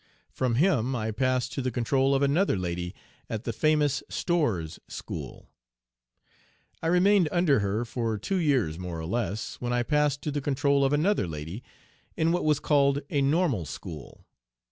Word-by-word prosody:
From 125 -3 0
him 135 - +2
I 110 -2 -2
passed 130 +2 0
to 135 - -2
the 130 - -1
control 135 +3 +1
of 135 - +2
another 145 - +2
lady 90 -1 -3 0.3
at 110 0 -4
the 115 - -3
famous 150 0 +2
"Storr's 115 - -1
School." - - -7 1.3
I 165 - -1
remained 180 0 +4
under 175 -7 +3
her 105 +3 -1
for 115 -2 -2
two 190 - -2
years 130 - +1
more 90 -2 -5
or 80 - -5
less, 105 +1 -3
when 120 0 -1
I 120 0 +1
passed 150 +1 +1
to 150 - -2
the 145 0 -2
control 140 0 +2
of 135 - +2
another 155 - +2
lady 80 +7 -6 0.6
in 160 +1 +2
what 175 -1 0
was 150 -2 +3
called 140 -1 +2
a 140 - +2
Normal 140 - +2
School. 75 0 -9
135 Hz, 165 wpm, -27 LUFS, 110-150 Hz, 1.3 s, remained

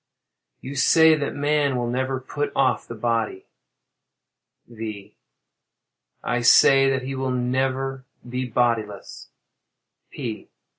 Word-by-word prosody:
You 135 +2 -7
say 160 +3 +5
that 150 -2 -2
man 145 -1 +1
will 120 -1 -1
never 130 +2 -2
put 145 +3 -4
off 135 -1 +1
the 115 - -7
body? 115 -4 -2 1.2
V. 110 -3 -8 1.1
I 125 0 -1
say 135 +2 +6
that 130 -1 -1
he 135 +1 -5
will 130 0 -3
never 130 +1 -1 0.2
be 125 +1 -3
bodiless. 115 -4 -2 0.8
_P. - - -6
130 Hz, 110 wpm, -23 LUFS, 120-135 Hz, 1.2 s, say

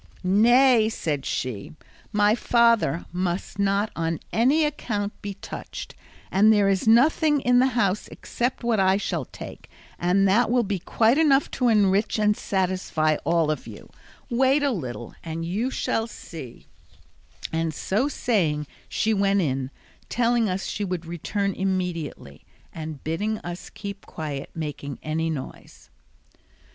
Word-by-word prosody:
"Nay," 230 +4 +5
said 150 -10 -3
she, 120 0 -4 0.4
"my 205 0 +4
father 235 - +2
must 180 +2 -3
not 200 +1 +1
on 165 -1 -1
any 275 +8 +3
account 210 -8 -2
be 200 -2 -5
touched, - - -8 0.4
and 210 +3 +5
there 205 -2 +4
is 195 +1 +1
nothing 295 +6 +4
in 245 -1 +4
the 260 - +5
house 200 -3 +1
except 245 +1 -3
what 235 -3 +1
I 190 0 +4
shall 175 -8 -2
take, - - -10 0.3
and 190 +3 +3
that 220 +5 +3
will 245 0 +3
be 200 -2 -2
quite 230 - +2
enough 285 -3 +3
to 250 - 0
enrich 210 -1 +3
and 210 -1 +3
satisfy 185 -6 0
all 165 -1 +2
of 155 - -4
you; - - -11 0.4
wait 265 +3 +2
a 285 - +2
little 125 - -5
and 165 0 -4
you 210 +9 -1
shall 225 -3 -1
see," 160 - -10 0.9
and 165 0 0
so 205 - 0
saying 170 - 0 0.2
she 220 - +1
went 200 -1 +2
in, 135 -4 -1 0.4
telling 235 -2 +2
us 185 +1 -2
she 205 - -3
would 180 -3 -3
return 195 +4 -2
immediately 180 - -3 0.3
and 155 -3 -7
bidding 205 +8 -1
us 175 +1 -7
keep 200 -1 -8
quiet 145 -3 -5
making 145 -4 -5
any 160 +1 -1
noise. 145 -5 -8
195 Hz, 145 wpm, -25 LUFS, 165-230 Hz, 0.9 s, Nay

